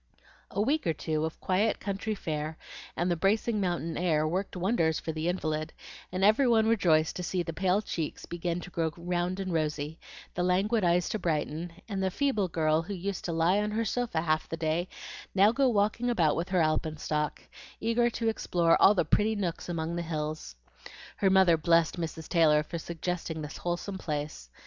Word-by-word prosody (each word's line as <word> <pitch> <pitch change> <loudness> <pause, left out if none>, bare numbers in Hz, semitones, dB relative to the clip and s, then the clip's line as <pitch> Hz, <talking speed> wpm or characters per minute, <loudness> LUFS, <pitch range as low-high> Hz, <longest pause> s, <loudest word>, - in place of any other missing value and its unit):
A 200 - -4
week 280 - +1
or 165 - +2
two 155 0 -2
of 160 - -6
quiet, 200 +4 +1
country 205 +2 -3
fare 155 -3 -4 0.4
and 175 +1 +1
the - - +2
bracing 210 +4 +1
mountain 175 -3 -1
air 155 -3 +2
worked 185 +3 -2
wonders 175 -4 +1
for 160 - -4
the 160 +1 -3
invalid, 155 -3 -2 0.4
and 185 +1 -2
every 215 +6 +5
one 225 -2 +4
rejoiced 175 -8 +3
to 180 - -4
see 180 0 -1
the 165 -1 -5
pale 190 +4 +1
cheeks 160 -6 -4
begin 175 0 -3
to 180 - -10
grow 165 -2 0
round 175 +2 -2
and 190 -2 -3
rosy, 155 0 -2 0.3
the 175 - -2
languid 195 +5 +2
eyes 175 0 +3
to 215 - -2
brighten, 165 0 -2 0.2
and 200 -3 -3
the 190 - +1
feeble 215 -2 0
girl 160 -2 +1
who 195 +4 -5
used 190 +1 -4
to 175 - -2
lie 165 +4 +3
on 210 0 0
her 225 +2 -1
sofa 230 -6 -1
half 155 -1 0
the 165 - -4
day 165 +3 -1 0.5
now 200 +2 +6
go 270 +2 +3
walking 215 +2 +1
about 165 -10 +2
with 170 +3 -2
her 180 -3 +3
alpenstock, 155 -1 -1 0.4
eager 230 +2 +2
to 230 -1 -3
explore 175 -6 +2
all 205 - +7
the 175 - +2
pretty 210 +7 +2
nooks 180 -4 -3
among 165 0 -2
the 175 - -1
hills. 155 - -4 0.6
Her 195 - +3
mother 190 -3 +5
blessed 165 +1 +3
Mrs. 160 -1 -5
Taylor 155 -3 +4
for 170 +2 -5
suggesting 165 -1 -4
this 150 - -7
wholesome 175 +3 -3
place. 150 - -4
175 Hz, 190 wpm, -29 LUFS, 160-200 Hz, 0.6 s, all